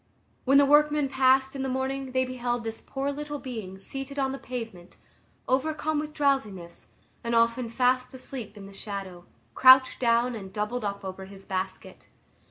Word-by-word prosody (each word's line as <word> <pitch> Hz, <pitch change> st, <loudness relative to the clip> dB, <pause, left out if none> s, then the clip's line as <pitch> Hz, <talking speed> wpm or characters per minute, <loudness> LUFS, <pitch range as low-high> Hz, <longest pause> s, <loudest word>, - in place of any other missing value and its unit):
When 275 Hz, +1 st, +5 dB
the 285 Hz, -, +7 dB
workmen 295 Hz, 0 st, +4 dB
passed 265 Hz, 0 st, +3 dB
in 270 Hz, -, -3 dB
the 265 Hz, -, -2 dB
morning, 265 Hz, +1 st, -2 dB
they 260 Hz, 0 st, +1 dB
beheld 245 Hz, -2 st, -2 dB
this 225 Hz, 0 st, -5 dB
poor 275 Hz, +1 st, -3 dB
little 295 Hz, +1 st, -5 dB
being 220 Hz, -9 st, -7 dB
seated 270 Hz, +8 st, -6 dB
on 270 Hz, -1 st, +1 dB
the 270 Hz, -, -5 dB
pavement, 225 Hz, -8 st, -7 dB, 0.5 s
overcome 310 Hz, +3 st, 0 dB
with 305 Hz, 0 st, -4 dB
drowsiness, 215 Hz, -, -1 dB, 0.4 s
and 235 Hz, 0 st, -1 dB
often 230 Hz, +1 st, +2 dB
fast 255 Hz, +1 st, +1 dB
asleep 245 Hz, -5 st, -7 dB
in 200 Hz, -, -9 dB
the 195 Hz, -, -12 dB
shadow, 195 Hz, -3 st, -7 dB, 0.3 s
crouched 260 Hz, 0 st, +7 dB
down 235 Hz, 0 st, +2 dB
and 195 Hz, -4 st, -7 dB
doubled 210 Hz, +4 st, -3 dB
up 200 Hz, -1 st, -4 dB
over 190 Hz, 0 st, -6 dB
his 195 Hz, 0 st, -12 dB
basket. 185 Hz, 0 st, -5 dB
250 Hz, 170 wpm, -27 LUFS, 210-270 Hz, 0.5 s, the